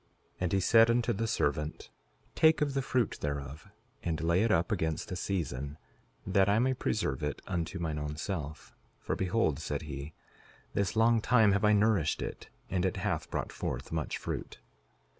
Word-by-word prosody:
And 90 -2 0
he 95 - +3
said 115 +5 +6
unto 120 0 +2
the 115 +3 -1
servant: 75 -5 -1 0.4
Take 160 -1 +4
of 145 -2 +1
the 135 - +1
fruit 130 -3 0
thereof, 70 +4 -4 0.3
and 80 -2 -2
lay 85 +3 +2
it 115 - +2
up 85 +5 +2
against 80 -6 -1
the 90 - -3
season, 75 -7 -3 0.5
that 95 +1 +3
I 100 - +4
may 130 +3 +3
preserve 105 - -1
it 75 -3 -2
unto 90 +1 -2
mine 80 -3 -2
own 75 0 -4
self; 75 -3 -5 0.3
for - - -2
behold, 90 -6 +1
said 75 -1 -3
he, 75 0 -6 0.6
this 100 0 0
long 115 0 +4
time 110 -3 +5
have 100 +1 +1
I 105 0 +5
nourished 105 -6 +2
it, - - -7 0.2
and 90 -1 -1
it 95 - 0
hath - - -2
brought - - -3
forth - - -4
much 80 -2 -2
fruit. - - -5
90 Hz, 180 wpm, -31 LUFS, 75-110 Hz, 0.6 s, said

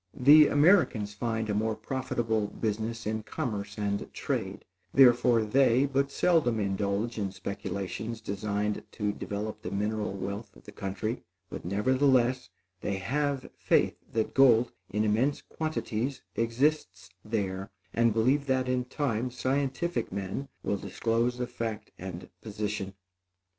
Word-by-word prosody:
The 145 +3 +8
Americans 145 - +4
find 110 +1 -2
a 105 - -1
more 110 +1 0
profitable 115 -5 -1
business 110 +2 -3
in 110 +1 -1
commerce 105 -2 -4
and 100 -1 -2
trade, - - -3 0.3
therefore 120 -3 +6
they 130 +3 +4
but 140 0 +1
seldom 140 -7 +2
indulge 100 +3 -1
in 100 -2 -1
speculations 100 +3 -4
designed 105 0 -2
to 105 -2 -1
develop 105 +1 -5
the 110 - -4
mineral 105 +1 -1
wealth 100 +3 -5
of - - -17
the - - -11
country; 100 +4 -3 0.3
but - - -6
nevertheless, 130 +5 +2 0.3
they 100 - -1
have 140 +7 -1
faith - - +2 0.2
that 110 -1 -1
gold, 125 -3 +5 0.2
in 105 +3 0
immense 115 +7 +1
quantities, 135 -5 -3
exists 115 -5 0
there, 100 -3 -2 0.2
and 115 0 +3
believe 130 +6 +2
that, 130 -1 +1
in 125 -1 0
time, 125 -3 -1
scientific 135 +2 -1
men 100 +8 -4
will 100 - 0
disclose 115 +4 0
the 125 - -1
fact 115 -3 -5
and 90 -1 -7
position. 105 -2 -4
110 Hz, 130 wpm, -29 LUFS, 105-130 Hz, 0.3 s, The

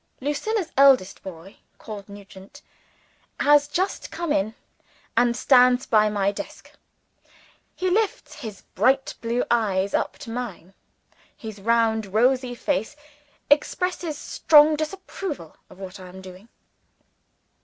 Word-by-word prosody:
Lucilla's 335 +7 -2
eldest 265 -9 +5
boy 185 +1 -11 0.2
called 205 -2 -9
Nugent 200 +6 -13 0.8
has 290 0 +5
just 370 +6 -2
come 340 -3 -4
in, 215 0 -1 0.6
and 240 0 +2
stands 250 -1 +5
by 215 -1 +3
my 200 -1 0
desk. 200 - -9 1.0
He 370 - -2
lifts 415 +3 0
his 220 -8 -8
bright 265 +6 +2
blue 235 +1 0
eyes 200 -4 +1
up - - -1
to 230 - -8
mine; 220 -7 -6 0.6
his 220 -3 -9
round 220 -2 +1
rosy 250 +2 +2
face 275 0 -2 0.6
expresses 335 +1 +1
strong 305 0 +5
disapproval 310 - -6
of - - -15
what 190 0 -9
I 185 - -10
am 185 +1 -11
doing. 190 +3 -13
235 Hz, 120 wpm, -24 LUFS, 200-290 Hz, 1.0 s, eldest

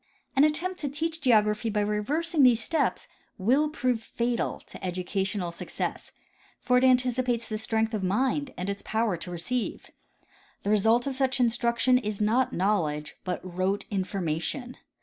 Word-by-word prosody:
An 270 - +6
attempt 330 +5 +1
to 290 - -2
teach 320 +3 -3
geography 215 -3 +3
by 210 -1 0
reversing 290 - 0
these 250 -4 +6
steps 325 +7 0 0.3
will 265 +10 +2
prove 250 -6 0
fatal 235 +1 -2
to - - -13
educational 185 0 -2
success, 170 - -5 0.5
for 250 -1 +3
it - - -1
anticipates 250 -2 +2
the 215 -2 -3
strength 220 +1 0
of 215 - -1
the 185 - 0
mind 260 +7 0
and 180 - -3
its 200 0 -3
power 220 -3 0
to 170 +2 -8
receive. 180 +8 -3 0.7
The 205 - 0
result 225 +3 +3
of 275 - -1
such 265 0 0
instruction 240 +1 +3
is 210 -4 -4
not 240 +5 +2
knowledge 170 -8 0
but 180 -1 -3
rote 185 +2 -1
information. 195 - -2
230 Hz, 155 wpm, -27 LUFS, 200-255 Hz, 0.7 s, An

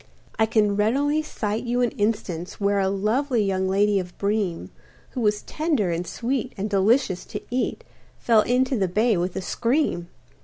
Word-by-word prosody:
I 220 - +4
can 215 -2 +2
readily 280 +9 +2
cite 220 -8 -3
you 245 0 0
an 240 - +1
instance 205 -5 -2
Where 200 0 +2
a 190 -1 +2
lovely 220 +5 +1
young 190 -1 0
lady 200 +1 +3
of 180 -1 -7
Breem, 200 -4 -1 0.4
Who 255 - -4
was 210 -1 +1
tender 300 - 0
and 170 +1 -3
sweet 255 +1 -2
and 200 +2 -2
delicious 200 0 +2
to - - -6
eat, 250 +1 -1 0.3
Fell 225 -2 +4
into 255 +3 +1
the 195 -5 +1
bay 215 +5 +2
with 175 +1 -2
a - - -3
scream. 235 - 0
210 Hz, 170 wpm, -24 LUFS, 195-245 Hz, 0.4 s, I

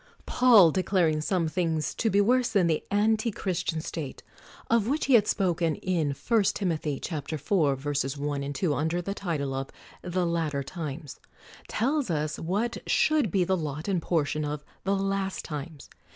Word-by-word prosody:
Paul 225 -10 +6
declaring 175 -4 +1
some 170 +1 0
things 160 -2 -1
to 225 - 0
be 200 - +3
worse 245 +4 +3
than 200 -5 +3
the 160 -2 +1
antichristian 205 -6 0
state 150 -6 -6 0.4
(of 230 -2 +2
which 290 +5 0
he 275 - +2
had 215 -3 +6
spoken 175 -5 +1
in 160 -6 -1
I. 225 - +1
Tim. 195 -2 0
iv: 155 0 -3
1, 145 -3 -1
2, 170 -5 +2
under 160 +4 -1
the 195 - -3
title 155 -9 -3
of 135 0 -3 0.3
the 180 0 -1
Latter 160 -4 -1
Times), 150 -1 -7 0.5
tells 270 +1 0
us 155 -2 -1
what 205 +8 -1
should 305 -8 +3
be 185 +2 +2
the 190 +2 +1
lot 155 -1 -4
and 190 -4 0
portion 155 -2 0
of 150 0 -4 0.2
the 195 +1 +2
Last 195 0 -2
Times. 150 0 -7
170 Hz, 155 wpm, -27 LUFS, 150-195 Hz, 0.5 s, Paul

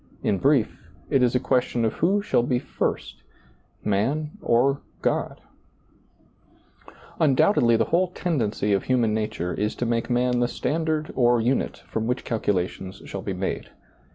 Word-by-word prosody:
In 100 - +1
brief, 135 -5 +1 0.2
it 135 - +4
is 125 0 +2
a - - +4
question 125 -2 +1
of 110 - 0
who 200 +5 +1
shall 205 - +2
be 125 +1 0
first 130 +2 -3 0.3
— - - -38
man 145 +9 0
or 135 +4 +2 0.2
God? - - -1 1.8
Undoubtedly 135 - +4
the - - +2
whole 180 +2 +2
tendency 125 - -1
of 100 - 0
human 120 -4 +2
nature 105 -5 -2
is 105 +1 -2
to 120 - -2
make 115 +1 -1
man 125 0 +2
the 120 - +2
standard 155 +4 -2
or 120 -2 +4
unit 125 +4 -1
from 110 0 -3
which 125 +1 -2
calculations 95 -3 -2
shall 100 - -6
be 95 - -3
made. 95 +1 -3
120 Hz, 155 wpm, -24 LUFS, 110-140 Hz, 1.8 s, it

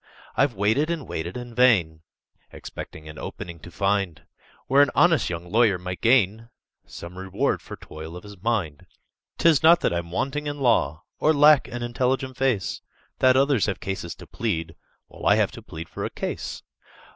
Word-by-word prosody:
"I've 135 -4 +2
waited 110 +11 +1
and 165 -5 -3
waited 85 +7 -4
in 120 -1 -8
vain, 100 -11 +3 0.5
Expecting 80 0 -9
an 75 0 -9
'opening' 85 -1 -7
to 90 - -11
find, 100 -3 -1 0.4
Where 135 +2 +5
an 145 - +5
honest 170 -4 +4
young 85 0 -6
lawyer 110 -3 +4
might 90 0 -6
gain 115 -2 +3 0.4
Some 85 +2 -9
reward 95 0 -1
for - - -9
toil 80 +2 -10
of 90 - -11
his 100 -3 -12
mind. 100 -10 -2 0.5
"'Tis 165 -4 +4
not 170 +2 +6
that - - +1
I'm 85 0 -3
wanting 140 - -2
in 145 0 -4
law, 115 - +2 0.2
Or 155 - +4
lack 150 -1 +6
an 120 0 -5
intelligent 130 +2 -1
face, 125 -7 0 0.4
That 130 0 +5
others 135 -5 +3
have 100 - -2
cases 95 -3 -5
to - - -12
plead, 80 0 -3 0.3
While - - -6
I - - +6
have - - +2
to - - -10
plead 80 +1 -8
for - - -6
a - - -2
case. - - -5
110 Hz, 180 wpm, -24 LUFS, 85-135 Hz, 0.5 s, not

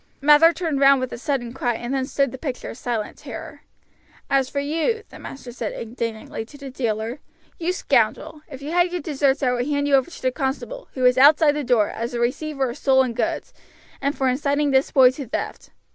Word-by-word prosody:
Mather 300 +3 +6
turned 330 -5 -2
round 275 0 +6
with 255 -1 -4
a - - -5
sudden 245 -3 -2
cry, 245 -3 -1
and 240 +3 -4
then 265 -1 -1
stood 275 -2 0
the 260 - -8
picture 265 -4 -5
of - - -11
silent 230 -4 -3
terror. - - -9 0.7
"As 270 -2 +2
for 280 - -2
you," 325 +10 -1
the - - -12
master 260 -2 -9
said 235 -3 -4
indignantly 230 -1 -5
to 235 +6 -14
the 280 -1 -8
dealer, 230 0 -2 0.4
"you 345 +1 0
scoundrel, 310 -3 0
if 275 -2 -9
you 295 - -5
had 350 +1 +2
your 355 -1 -3
deserts 280 -3 0
I 250 - +3
would 245 +1 -1
hand 285 -1 0
you 285 - 0
over 270 +3 +4
to 340 - -12
the 255 - +2
constable, 290 - -4
who 255 -1 0
is 250 0 +5
outside 295 +2 +7
the 295 0 -3
door, 240 -5 +2
as 235 +2 -4
a - - -2
receiver 270 +2 -1
of 260 - -10
stolen 265 -3 +3
goods, - - -2 0.5
and 280 +1 -1
for 265 - +1
inciting 285 +2 +1
this 265 0 +3
boy 255 -2 +6
to 260 0 -7
theft. - - -5
270 Hz, 220 wpm, -22 LUFS, 250-295 Hz, 0.7 s, outside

